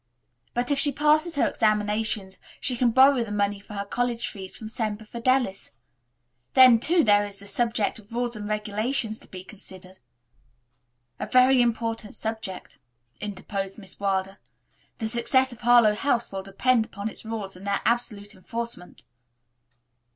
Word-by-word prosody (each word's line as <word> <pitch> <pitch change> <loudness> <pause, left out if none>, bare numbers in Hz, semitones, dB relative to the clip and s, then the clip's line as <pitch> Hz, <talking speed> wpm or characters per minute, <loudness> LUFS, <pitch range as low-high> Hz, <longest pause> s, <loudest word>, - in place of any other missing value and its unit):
But 245 +3 0
if 280 - +2
she 290 0 +4
passes 305 +4 +2
her 285 - +2
examinations 210 -2 0 0.2
she 255 - +3
can 245 0 +2
borrow 260 +1 +5
the 215 - -8
money 205 -1 -1
for 210 +1 -11
her 200 0 -3
college 240 +2 -2
fees 190 -2 -8
from 220 - -8
Semper 220 -1 -3
Fidelis. 235 - -1 0.8
Then, 255 -3 +8
too, 335 +7 +3
there 205 -2 +5
is 200 -1 -5
the 200 - -4
subject 225 0 0
of 210 +1 -19
rules 240 0 -2
and 205 -1 -6
regulations 215 +2 0
to - - -15
be 185 -1 -9
considered." 190 -2 -12 1.2
"A - - -4
very 255 0 +5
important 225 -2 -2
subject," 205 -10 -6 0.4
interposed 195 -1 -5
Miss 195 -4 -8
Wilder. 195 -1 -2 0.6
"The 225 - -4
success 255 +3 +1
of 240 - -12
Harlowe 240 -3 +5
House 235 +1 0
will 195 -1 -4
depend 220 +5 +1
upon 200 +1 -6
its 220 - -5
rules 220 -4 -5
and 190 +2 -10
their 200 0 0
absolute 215 -3 -1
enforcement." 230 -1 -7
220 Hz, 155 wpm, -25 LUFS, 200-240 Hz, 1.2 s, Then